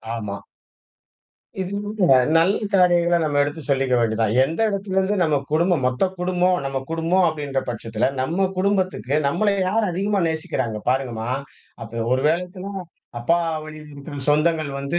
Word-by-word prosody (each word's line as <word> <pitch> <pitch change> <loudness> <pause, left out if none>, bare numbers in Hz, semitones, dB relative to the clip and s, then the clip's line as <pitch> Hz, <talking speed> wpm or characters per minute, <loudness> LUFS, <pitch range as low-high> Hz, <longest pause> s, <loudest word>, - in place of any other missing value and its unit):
ஆமா. 105 -3 -5 1.2
இது 190 +1 -3
போன்ற 200 -10 +3 0.2
நல்ல 170 +5 +4 0.2
காரியங்களை 175 -2 +4
நம்ம 145 -2 +1
எடுத்து 145 +3 -4
சொல்லிக்க 135 -2 +2
வேண்டியது 115 -1 0
தான். 110 +1 +1
எந்த 160 +9 -3
இடத்துலேருந்து 195 0 0
நம்ம 150 -3 +2
குடும்பம், 165 -2 +2
மொத்த 130 +9 +1
குடும்பம், 180 0 +2
நம்ம 135 -1 -2
குடும்பம் 165 +3 +2
அப்படின்ற 145 -3 -3
பட்சத்தில, 115 +1 -1
நம்ம 180 +8 0
குடும்பத்துக்கு 185 - 0
நம்மளை 200 +7 +1
யார் 210 +1 +1
அதிகமா 195 +2 0
நேசிக்கிறாங்க. 130 -8 -3
பாருங்கம்மா! 125 -3 -1 0.5
அப்ப 115 0 -5
ஒரு 130 - +1
வேளத்துல, 180 +3 -3 0.5
அப்பா 170 +9 +2 0.3
வழியில 155 0 -10
இருக்கிற 145 +1 -9
சொந்தங்கள் 155 0 +2
வந்து 140 +5 -2
160 Hz, 140 wpm, -22 LUFS, 135-185 Hz, 1.2 s, நல்ல